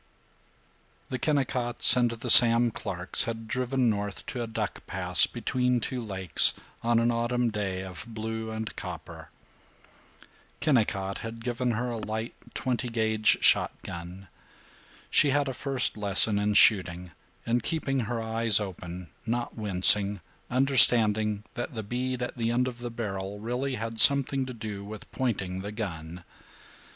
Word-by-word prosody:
VII - - -37
The 130 - -3
Kennicotts 125 -5 +2
and 120 -1 +2
the 115 +1 -2
Sam 120 0 +8
Clarks 90 -3 -3
had 115 -1 -6
driven 130 +1 -1
north 100 -3 -3
to 125 - -5
a 115 - -4
duck 110 - -5
pass - - +3
between 125 -1 -1
two 125 +2 -4
lakes, 95 -6 +4 0.3
on 120 0 +1
an 115 +1 +2
autumn 120 0 -1
day 95 -3 -4
of 95 0 -8
blue 110 0 -6
and 110 0 -6
copper. - - -9 1.3
Kennicott 105 -9 0
had 115 0 -8
given 120 0 -2
her 120 +2 -3
a 115 - -4
light 110 +2 -5 0.2
twenty 125 -1 -3
gauge 110 -1 +1
shotgun. 90 +3 0 0.8
She 145 - +4
had 140 +1 +1
a 135 - -3
first 135 -1 -3
lesson 100 0 +1
in 105 0 -1
shooting, 90 -5 +3 0.3
in 120 +1 0
keeping 135 0 -2
her 120 0 -3
eyes 110 -1 +4
open, 90 -3 -8 0.2
not 120 +1 -3
wincing, 100 -1 +5 0.3
understanding 110 -5 +4
that 120 +2 -6
the 110 - -5
bead 125 +3 -4
at 125 - -6
the 115 -1 -1
end 125 +2 0
of 125 -1 -7
the 120 0 -6
barrel 100 -4 -6
really 125 +5 -3
had 115 -1 -6
something 135 +1 +5
to 130 - -7
do 105 -3 -7
with 105 +1 -11
pointing 100 -8 -3
the 100 +2 -6
gun. 90 -5 -7
115 Hz, 150 wpm, -27 LUFS, 105-125 Hz, 1.3 s, Sam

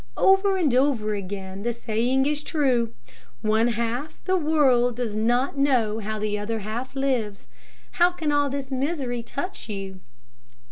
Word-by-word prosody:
Over 385 0 +4
and 310 -9 +2
over 250 -5 +2
again 195 -1 -5
the 240 +3 0
saying 235 +3 0
is 295 0 0
true, 260 -7 +1 0.5
one 220 +2 +3
half 235 +5 -2
the 375 - +1
world 275 -8 +3
does 235 -3 -3
not 245 +5 +1
know 240 -6 +2
how 215 0 -3
the 210 -1 -1
other 225 +2 -2
half 235 +6 -5
lives. 250 -7 -1 0.5
How 350 0 +4
can 320 -4 -2
all 290 -1 +2
this 275 0 -4
misery 265 -3 -1
touch 280 - -6
you? 195 -2 -5
245 Hz, 150 wpm, -25 LUFS, 215-285 Hz, 0.5 s, Over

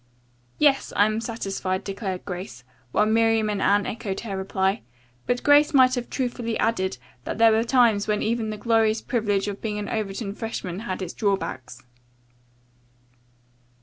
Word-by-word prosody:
"Yes, 285 -2 +3
I 205 - +5
am 215 +1 -1
satisfied," 195 -4 -3
declared 195 -2 -5
Grace, 180 - -7 0.3
while 210 - +3
Miriam 225 0 +2
and 200 -1 -2
Anne 205 0 +3
echoed 205 -3 -4
her 210 -4 -5
reply, 190 -1 -1 0.5
but 245 0 0
Grace 290 0 +5
might 255 -1 +6
have 245 -2 -3
truthfully 240 -3 -2
added 190 - 0 0.3
that - - -4
there 225 0 +6
were 220 +1 +3
times 230 -4 +3
when 210 -1 0
even 225 0 -1
the 215 - -4
glorious 225 0 +2
privilege 205 -5 0
of 200 -1 -5
being 210 -2 -3
an 210 - -4
Overton 200 -1 -3
freshman 200 -5 -5
had 190 -4 -4
its 180 - -6
drawbacks. 160 - -3
215 Hz, 155 wpm, -24 LUFS, 195-230 Hz, 0.5 s, might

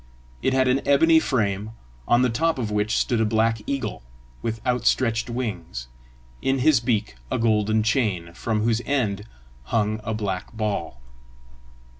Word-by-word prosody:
It 130 - +1
had 130 0 +3
an 130 +2 +2
ebony 160 +3 +5
frame, 105 -6 -1 0.3
on 120 +1 +4
the 125 - +3
top 165 +8 +1
of 115 -4 -2
which 105 +1 +1
stood 120 -2 +1
a - - +4
black 110 +1 +1
eagle, 140 -1 -3 0.4
with 115 +5 -3
outstretched 120 -1 +1
wings, 95 - -4 0.5
in 135 0 +1
his 135 -1 +4
beak 110 - -1
a - - 0
golden 110 -1 +2
chain, 105 -8 0
from 110 +4 -1
whose 115 0 +1
end 110 -8 0 0.4
hung 110 - 0
a 110 +1 -2
black 95 -3 -3
ball. 105 - -3
115 Hz, 150 wpm, -24 LUFS, 105-125 Hz, 0.5 s, ebony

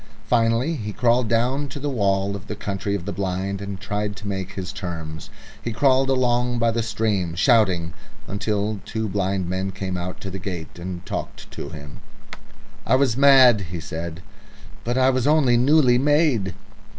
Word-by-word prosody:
Finally 120 +6 +2
he 105 -3 -4
crawled 120 +2 +2
down 125 +6 +1
to 140 - -7
the 145 - -3
wall 100 -6 0
of 100 0 -9
the 105 - -4
Country 100 0 -3
of 90 -4 -5
the 100 - -3
Blind 95 +1 -2
and 100 -1 -5
tried 105 +1 -3
to 105 - -8
make 95 -1 -4 0.2
terms. 85 -6 -6 0.3
He 120 - -3
crawled 135 +3 +3
along 125 -1 +1
by 115 0 +2
the 115 +1 0
stream, 105 -6 -1
shouting, 95 - +3 0.3
until 105 +1 -1
two 110 +1 -3
blind 95 -2 -1
men 95 +2 -2
came 95 -1 -4
out 90 +1 -5
to 95 - -6
the 95 - -5
gate 85 -3 -6
and 90 0 -6
talked - - -6
to 70 - -6
him. 75 -3 -10 0.8
"I - - +3
was 130 -4 +2
mad," 130 -5 +7
he 85 0 -5
said. 80 +1 -6 0.6
"But 120 +2 -1
I 130 0 +4
was 130 0 0
only 145 -5 +4
newly 125 0 +4
made." 140 - +2
105 Hz, 175 wpm, -23 LUFS, 95-125 Hz, 0.8 s, mad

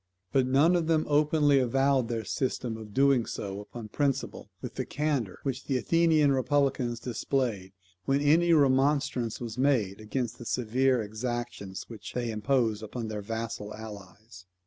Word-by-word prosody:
But 130 -2 +2
none 145 +7 +4
of 170 -2 0
them 160 -1 +2
openly 150 -1 +3
avowed 135 0 +2
their 115 -1 -3
system 125 -3 -2
of 110 -1 -9
doing 135 0 +3
so 100 0 -5
upon 110 +1 -9
principle, 140 +2 -2
with - - -7
the - - -3
candour 145 -10 -2
which 135 -1 -3
the 135 - 0
Athenian 160 +1 +3
republicans 130 -2 +1
displayed, 115 -5 -2 0.3
when 135 +1 +2
any 160 +4 +4
remonstrance 135 -5 +2
was 115 0 -6
made 120 -8 +1
against 120 +1 -3
the 120 - -8
severe 125 +1 +1
exactions 110 -2 -5
which 110 -3 -9
they 120 -2 -2
imposed 110 0 +1
upon 110 +1 -5
their 105 -1 -4
vassal 110 0 -5
allies. 100 -3 -11
125 Hz, 150 wpm, -28 LUFS, 110-140 Hz, 0.3 s, none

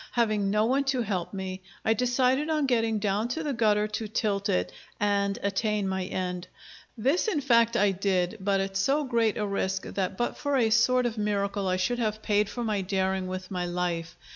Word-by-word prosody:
Having 215 -4 +1
no 210 +2 +2
one 265 +4 +2
to 265 -3 +1
help 185 -5 -2
me, 190 -1 -5 0.2
I 220 - +4
decided 255 +5 +1
on 305 -2 +1
getting 225 -4 +1
down 205 +2 0
to 320 +7 -3
the 290 -2 -1
gutter 210 -3 +2
to 215 +1 -3
tilt 205 -2 -1
it, 90 0 0 0.3
and 200 -1 +1
attain 200 0 0
my 190 -1 -2
end. 180 -1 -3 0.5
This 270 - +1
in 375 -9 +1
fact 235 -4 +3
I 205 0 +4
did, 185 -1 0
but 195 0 +1
at 195 0 -3
so 275 +10 +2
great 230 -5 +1
a 210 - 0
risk 190 -1 -1
that 190 -1 -3
but 240 - -1
for 285 -1 0
a 225 -3 +2
sort 250 +2 +4
of 230 -2 -2
miracle 200 -1 -1
I 185 0 +1
should 215 +7 0
have 215 -2 -2
paid 210 0 +2
for 240 +3 -4
my 210 -3 0
daring 190 0 -1
with 185 +1 -6
my 180 -1 -2
life. 175 -2 -3
210 Hz, 205 wpm, -27 LUFS, 190-235 Hz, 0.5 s, I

